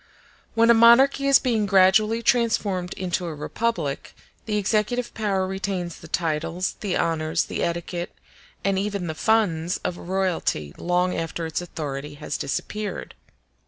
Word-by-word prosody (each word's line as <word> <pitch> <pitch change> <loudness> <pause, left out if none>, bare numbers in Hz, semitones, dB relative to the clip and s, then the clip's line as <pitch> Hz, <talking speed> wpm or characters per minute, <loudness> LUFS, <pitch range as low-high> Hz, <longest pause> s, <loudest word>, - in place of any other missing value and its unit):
When 230 +1 +5
a - - +8
monarchy 245 +5 +6
is 275 -1 +8
being 225 -5 0
gradually 210 +4 +4
transformed 205 -7 +1
into 180 -1 -2
a 160 - -5
republic, 150 -1 -3 0.3
the 210 -1 0
executive 215 +4 0
power 200 -4 0
retains 190 -2 -3
the 165 - -12
titles, 165 +2 -1
the 195 -4 -1
honors, 160 0 0
the - - -4
etiquette, 170 +1 -3 0.5
and 195 -1 +1
even 200 -2 -2
the 160 - -3
funds 175 -3 +1
of 175 - -3
royalty 180 - -1
long 180 +1 +1
after 165 0 -3
its 160 +2 -2
authority 145 -4 -6
has 150 0 -5
disappeared. 205 +7 -4
185 Hz, 140 wpm, -24 LUFS, 165-215 Hz, 0.5 s, a